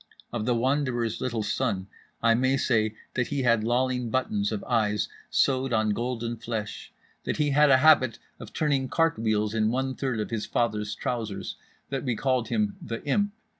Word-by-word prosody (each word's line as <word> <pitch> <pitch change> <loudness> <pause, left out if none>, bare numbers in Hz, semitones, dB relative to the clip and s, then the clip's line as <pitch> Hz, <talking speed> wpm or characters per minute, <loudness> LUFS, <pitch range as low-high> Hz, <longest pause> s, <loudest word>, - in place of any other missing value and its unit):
Of 110 - -2
The 125 - +3
Wanderer's 125 -2 0
little 120 -4 -1
son 95 -2 -1 0.4
I 115 -1 +5
may 130 +3 +2
say 110 -5 +1 0.2
that 125 -1 0
he 140 -2 -1
had 115 -3 +3
lolling 125 +1 0
buttons 110 -4 0
of 105 -2 -3
eyes 105 -4 +1 0.2
sewed 130 -1 +2
on 110 -1 +2
gold 120 +2 -2 0.2
flesh, 110 -3 -5 0.3
that - - -2
he 150 -1 +1
had 150 +1 +5
a 130 - +7
habit 130 -7 +6 0.2
of - - -9
turning 140 -4 0
cart 165 -7 +2
wheels 105 -1 0
in 110 -1 +2
one 130 +2 -1
third 130 -4 -2
of 105 - -3
his 110 -2 -2
father's 105 -3 -1
trousers, 110 -5 -3 0.4
that 135 - -2
we 125 -4 0
called 130 -1 0
him 210 -2 0
The 115 -8 -5
Imp. 205 +9 +1
120 Hz, 180 wpm, -27 LUFS, 110-130 Hz, 0.4 s, a